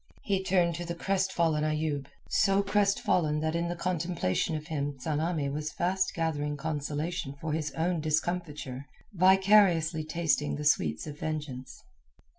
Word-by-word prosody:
He 195 -2 0
turned 180 -2 +2
to 175 - -4
the 170 0 -4
crestfallen 170 -4 +1
Ayoub, 155 -2 -1 0.2
so 200 -1 +3
crestfallen 195 -6 +2
that 160 +1 -1
in 170 0 0
the 175 - -3
contemplation 170 - -1
of 155 -1 -5
him 145 -3 -3
Tsamanni 155 +2 -1
was 150 +1 -3
fast 190 +2 0
gathering 150 -3 -1
consolation 150 +1 -3
for 155 0 -3
his 155 -1 -1
own 170 0 0
discomfiture, 150 -4 -2 0.3
vicariously 185 -3 +4
tasting 155 -2 0
the 150 - -5
sweets 80 - +2
of 150 -1 -8
vengeance. 150 -5 -5
160 Hz, 140 wpm, -29 LUFS, 150-180 Hz, 0.3 s, vicariously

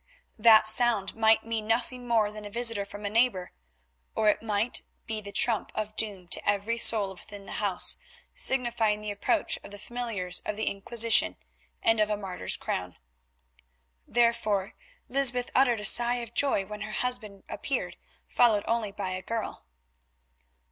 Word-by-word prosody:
That 220 -1 +6
sound 220 -3 +4
might 220 0 +3
mean 225 -1 -4
nothing 245 +2 -2
more 220 -3 +2
than 210 0 -9
a 205 - -7
visit 230 -2 +1
from 205 +1 -9
a - - -1
neighbour, 225 -5 +1 0.6
or 215 -1 +3
it - - +1
might 220 +1 0 0.2
be 220 -2 -4
the 200 -1 -9
trump 225 +1 +1
of 215 0 -4
doom 200 -5 -3
to - - 0
every 205 +3 -1
soul 205 -5 +3
within 200 +2 -12
the - - -10
house, 195 -3 +1 0.3
signifying 240 - +2
the 210 -1 -4
approach 250 +10 0
of - - -11
the 205 - -10
familiars 210 -6 -2
of 210 - -5
the 220 - -3
Inquisition 225 +3 +1 0.5
and 225 -1 +3
of 215 0 +2
a 210 - -1
martyr's 190 -3 -2
crown. 90 0 -5 1.1
Therefore 230 -5 0 0.3
Lysbeth 250 -2 +2
uttered 245 -4 +3
a - - -6
sigh 240 +3 +5
of 235 -1 -7
joy 255 -8 +1
when 210 +1 -9
her 215 +1 -6
husband 220 -5 -2
appeared, - - -4 0.3
followed 220 -4 +3
only 225 -3 -1
by 195 -2 -5
a 185 0 -4
girl. 220 - -5
215 Hz, 160 wpm, -27 LUFS, 205-235 Hz, 1.1 s, That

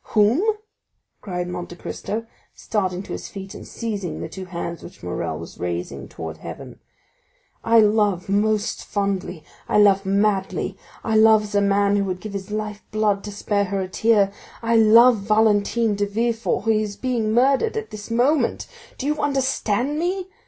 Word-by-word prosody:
—whom?" 215 - +3 0.8
cried 180 -3 -4
Monte 175 -1 -6
Cristo, 220 +5 -5 0.3
starting 190 -3 -2
to - - -10
his - - -5
feet, 195 -1 -8
and - - -10
seizing 205 -7 -4
the - - -4
two 190 +3 -8
hands 170 -1 -5
which 175 - -13
Morrel 85 -3 -3
was 85 - -10
raising 85 -6 -4
towards 80 -1 -7
heaven. - - -9 0.8
"I 230 0 +6
love 210 -4 +2
most 215 +2 0
fondly—I 195 -5 -3
love 200 -2 +5
madly—I 195 +1 -1
love 220 0 +6
as 210 0 -8
a 205 - +3
man 200 0 +3
who 200 - +1
would 185 -1 -3
give 210 +1 -7
his 195 0 -5
life 210 0 -4
blood 210 -2 +1
to 205 - -5
spare 200 0 0
her 195 +1 -2
a 190 - -2
tear—I 220 +3 0
love 230 +2 +7
Valentine 215 +2 +2
de 205 0 -1
Villefort, 225 -2 -1
who 225 - +3
is 215 -2 0
being 240 -4 -1
murdered 275 - +3
at 440 - -5
this 215 +1 -8
moment! 255 +6 +1 0.3
Do 265 - -5
you 300 +1 0
understand 270 -1 0
me? 365 +2 -1
205 Hz, 160 wpm, -22 LUFS, 195-225 Hz, 0.8 s, love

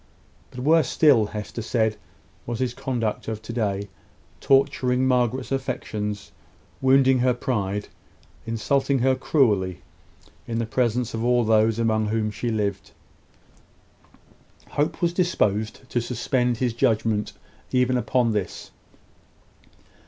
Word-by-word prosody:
But 125 - -8
worse 155 +1 +4
still, 135 -9 +4
Hester 105 +2 -6
said, 110 -1 0 0.5
was 120 -1 -2
his 125 -1 -1
conduct 125 -5 -3
of 110 -1 -3
to 115 - -6
day, 100 -4 -1 0.5
torturing 135 -2 +2
Margaret's 125 0 0
affection, 120 -6 -3 0.6
wounding 130 0 +4
her 125 0 +2
pride, 105 -5 -2 0.6
insulting 135 +5 +1
her 130 +1 +3
cruelly, 105 - +1 0.6
in 115 - -2
the 115 - 0
presence 120 0 0
of 115 0 -3
all 120 0 +3
those 110 0 +3
among 110 -2 +1
whom 110 0 -1
she 120 +3 -3
lived. 100 -3 -2 1.8
Hope 150 +4 -1
was 170 0 +2
disposed 110 - 0
to 120 - +1
suspend 125 0 0
his 125 -1 0
judgment 115 -3 0 0.4
even 125 0 +2
upon 125 0 +1
this. 105 -4 -4
120 Hz, 120 wpm, -24 LUFS, 110-130 Hz, 1.8 s, worse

